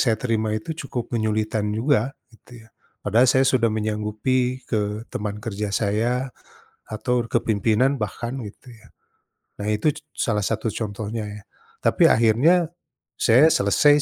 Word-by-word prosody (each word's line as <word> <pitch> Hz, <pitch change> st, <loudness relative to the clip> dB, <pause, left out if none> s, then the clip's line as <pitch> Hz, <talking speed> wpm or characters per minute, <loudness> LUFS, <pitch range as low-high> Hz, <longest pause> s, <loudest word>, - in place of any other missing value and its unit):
saya 115 Hz, -4 st, +2 dB
terima 110 Hz, -3 st, 0 dB
itu 110 Hz, +9 st, -5 dB, 0.2 s
cukup 120 Hz, -1 st, -5 dB
menyulitkan 110 Hz, -1 st, 0 dB
juga, 130 Hz, +1 st, +1 dB, 0.2 s
gitu 115 Hz, 0 st, -16 dB
ya. -, -, -24 dB, 0.4 s
Padahal 115 Hz, +5 st, +4 dB
saya 130 Hz, +1 st, +4 dB
sudah 115 Hz, -3 st, +3 dB
menyanggupi 110 Hz, +4 st, -1 dB
ke 105 Hz, 0 st, -2 dB
teman 105 Hz, -1 st, -4 dB
kerja 105 Hz, -1 st, -4 dB
saya 115 Hz, +6 st, 0 dB, 0.6 s
atur 120 Hz, +2 st, -1 dB
ke -, -, +3 dB
pimpinan 115 Hz, +5 st, +2 dB
bahkan 120 Hz, +4 st, -4 dB
gitu 110 Hz, +5 st, -13 dB
ya. 110 Hz, -, -19 dB, 0.7 s
Nah, 105 Hz, -, -3 dB
itu 105 Hz, +8 st, +1 dB
c -, -, -11 dB
salah 105 Hz, -4 st, 0 dB
satu 115 Hz, -, -1 dB
contohnya 110 Hz, 0 st, -4 dB
ya, 105 Hz, -1 st, -9 dB, 0.4 s
tapi -, -, +4 dB
akhirnya 135 Hz, +10 st, +4 dB, 0.5 s
saya 130 Hz, +7 st, +5 dB
selesai 145 Hz, +9 st, +4 dB
110 Hz, 140 wpm, -23 LUFS, 105-125 Hz, 0.7 s, saya